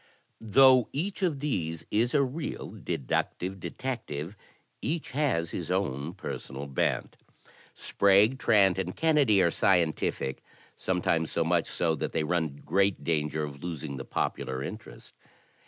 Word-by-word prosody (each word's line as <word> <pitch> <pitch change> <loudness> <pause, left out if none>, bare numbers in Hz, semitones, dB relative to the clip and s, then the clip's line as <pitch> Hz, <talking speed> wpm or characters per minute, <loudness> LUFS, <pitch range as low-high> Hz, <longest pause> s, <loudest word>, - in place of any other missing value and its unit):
Though 130 +3 +5
each 190 +8 -3
of 160 -7 0
these 85 - -2
is 120 +6 +1
a 140 - +5
real 140 +4 -4
deductive 90 +8 -3
detective, 85 - -5 0.5
each 160 0 -3
has 130 - 0
his 85 -3 -4
own 85 -4 -1
personal 70 -7 -6
bent. 70 -2 -1 0.6
Sprague, 100 +6 +3
Trant 95 -4 +4
and 90 -1 -3
Kennedy 145 -12 +4
are 85 - +3
scientific, 85 -8 +1 0.2
— - - -28
sometimes 85 -3 0
so 85 - +1
much 85 +1 +1
so 80 -2 0
that - - -3
they 80 - +1
run 80 -3 -1
great 100 -1 +1
danger 75 -1 0
of 70 -2 -7
losing 75 -5 -5
the 65 - -5
popular 65 0 -2
interest. 110 +9 -9
90 Hz, 140 wpm, -28 LUFS, 80-120 Hz, 0.6 s, Though